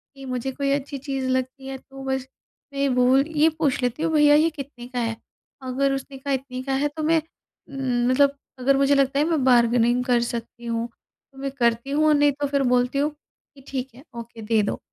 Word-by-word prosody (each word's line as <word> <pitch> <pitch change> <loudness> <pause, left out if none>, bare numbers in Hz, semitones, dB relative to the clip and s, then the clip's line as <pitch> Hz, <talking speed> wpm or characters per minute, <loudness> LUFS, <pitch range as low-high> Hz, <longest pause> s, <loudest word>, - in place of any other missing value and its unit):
कि 270 0 -10
मुझे 255 0 -3
कोई 275 +1 -1
अच्छी 280 0 -2
चीज़ 270 -1 -3
लगती 260 +1 -2
है 270 0 -5
तो 270 +1 -12
बस 265 -1 -2 0.5
मैं 275 - -5
ये 280 - +2
भूल 255 +1 +4
ये 310 +2 +5
पूछ 285 -5 +1
लेती 250 +5 -1
हूँ 330 - +1
भईया 295 -1 +6
ये 315 +2 +4
कितने 275 -5 -9
का 250 -1 -4
है? 225 -1 -2 0.4
अगर 265 +2 0
उसने 270 0 -5
कहा 275 +1 -3
इतने 260 -1 -4
का 270 0 -2
है 280 +2 +1
तो 310 - -2
मैं 320 +1 +3 0.5
उम, 250 -3 0
मतलब 280 +2 +3 0.2
अगर 270 +2 +3
मुझे 275 +1 +4
लगता 275 0 +2
है 295 - +3
मैं 315 -6 +1
बार्गेनिंग 240 -1 +4
कर 245 -2 +3
सकती 235 0 -5
हूँ 230 0 -2 0.5
तो 270 - -19
मैं 275 0 -3
करती 235 0 0
हूँ 300 +2 +2
और 305 - +5
नहीं 290 0 +4
तो 285 +1 -3
फ़िर 280 0 +1
बोलती 250 +2 +1
हूँ 295 +2 +1 0.4
कि 275 - -15
ठीक 265 -1 -4
है 265 - -14
ओके 230 -1 -8
दे 220 0 +2
दो, 200 - -2
270 Hz, 225 wpm, -24 LUFS, 250-280 Hz, 0.5 s, भईया